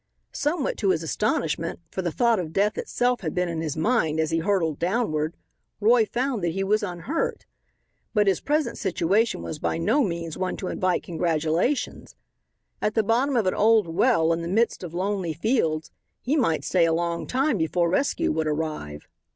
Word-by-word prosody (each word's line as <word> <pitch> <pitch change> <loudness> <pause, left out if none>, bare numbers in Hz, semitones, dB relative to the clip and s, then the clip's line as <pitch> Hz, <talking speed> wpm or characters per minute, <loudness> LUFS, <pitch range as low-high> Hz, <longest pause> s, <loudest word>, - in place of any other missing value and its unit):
Somewhat 295 0 -1
to 200 - +1
his 165 -3 +1
astonishment, 165 -2 -1
for 190 - -3
the 175 -2 -2
thought 235 +2 +2
of 165 -3 -4
death 205 +2 +2
itself 245 -1 0
had 160 -5 -4
been 180 0 +1
in 165 -1 -3
his 155 -2 -3
mind 160 -5 +1
as 160 0 0
he 165 - +1
hurtled 165 -4 0
downward, 170 -5 0 0.4
Roy 225 +1 +4
found 245 -3 -1
that 170 -1 0
he 195 +2 -1
was 210 +3 +2
unhurt. 205 - -3 0.7
But 210 -2 +3
his 195 -3 +2
present 300 +1 -1
position 195 +4 +1
was 155 - -5
by - - -1
no 225 - +2
means 170 -5 -4
one 185 -1 -2
to 185 - -4
invite 185 -1 0
congratulations. 165 - -1 0.7
At 210 - 0
the 220 - +3
bottom 250 +6 +1
of 230 -4 +2
an 185 - +2
old 215 -4 +3
well 165 -3 +3
in 165 - -2
the 170 - -4
midst 225 +6 +1
of 175 -2 -7
lonely 190 -2 -1
fields 160 - 0 0.3
he 275 +5 -1
might 220 - +1
stay 175 -3 +3
a 165 - +2
long 170 0 -1
time 260 -4 +1
before 170 +2 +1
rescue 225 +11 +1
would 160 0 -1
arrive. 150 - -4
185 Hz, 185 wpm, -25 LUFS, 165-225 Hz, 0.7 s, Roy